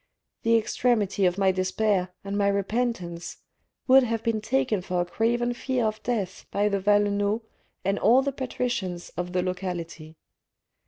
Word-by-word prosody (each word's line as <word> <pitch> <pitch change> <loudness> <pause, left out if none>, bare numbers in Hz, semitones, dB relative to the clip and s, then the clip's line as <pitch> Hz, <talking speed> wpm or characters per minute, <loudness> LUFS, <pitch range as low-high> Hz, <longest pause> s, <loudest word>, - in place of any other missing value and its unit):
The 230 0 +4
extremity 215 -4 +1
of 180 +1 -1
my 195 -1 +4
despair 185 0 0
and 200 0 -4
my 200 -1 +2
repentance 200 -4 -2 0.5
would 265 0 +7
have 230 -3 -1
been 225 -2 0
taken 180 +2 0
for 180 -1 -2
a - - -1
craven 240 +5 0
fear 255 -1 -1
of 215 0 -2
death 205 -6 -3
by 205 +1 +1
the 200 -1 0
Valenods 205 +2 +2 0.4
and 195 +1 +1
all 250 +5 +5
the 280 - 0
patricians 245 -9 -3
of 180 +1 -5
the 180 0 +1
locality. 175 -4 -5
205 Hz, 155 wpm, -26 LUFS, 185-230 Hz, 0.5 s, would